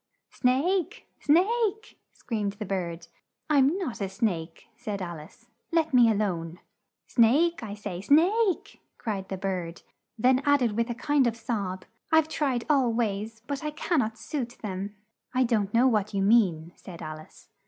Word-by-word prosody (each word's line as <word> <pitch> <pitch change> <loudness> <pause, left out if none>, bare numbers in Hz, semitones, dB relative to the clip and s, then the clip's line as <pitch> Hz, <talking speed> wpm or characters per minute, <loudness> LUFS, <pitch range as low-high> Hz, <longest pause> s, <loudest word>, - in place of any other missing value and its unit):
"Snake! 295 +9 0
snake!" 435 +6 +1
screamed 210 -4 -3
the 210 +1 -6
bird. 175 -3 -3 0.5
"I'm 285 +4 +4
not 315 - -4
a 195 - -1
snake," 180 -5 -3
said 215 -4 -5
Al 175 -3 -5
ice. 155 +4 -15 0.3
"Let 320 -3 +1
me 240 -2 +6
a 220 - +2
lone!" 175 -5 -2 0.5
"Snake, 290 +9 +3
I 210 -3 -6
say, 200 -4 -6
Snake!" 360 - +2 0.2
cried 195 -4 -4
the 190 - -3
bird, 180 -3 -4 0.3
then 255 +3 +3
add 285 -2 +3
ed 235 - +2
with 230 +3 -1
a 240 - -2
kind 275 +1 +2
of 230 -1 -2
sob, 200 -5 -3 0.3
"I've 320 -1 +5
tried 270 -6 -1
all 270 -5 +3
ways, 220 -1 -2
but 280 +2 -4
I 305 - -1
can 310 +2 0
not 220 -2 -1
suit 245 0 -5
them." 200 0 -4 0.4
"I 255 - +4
don't 215 -5 +1
know 240 +4 +4
what 210 -4 0
you 195 - +1
mean," 185 -7 +3
said 170 -3 -10
Al 155 0 -6
ice. 155 - -17
230 Hz, 170 wpm, -27 LUFS, 195-280 Hz, 0.5 s, me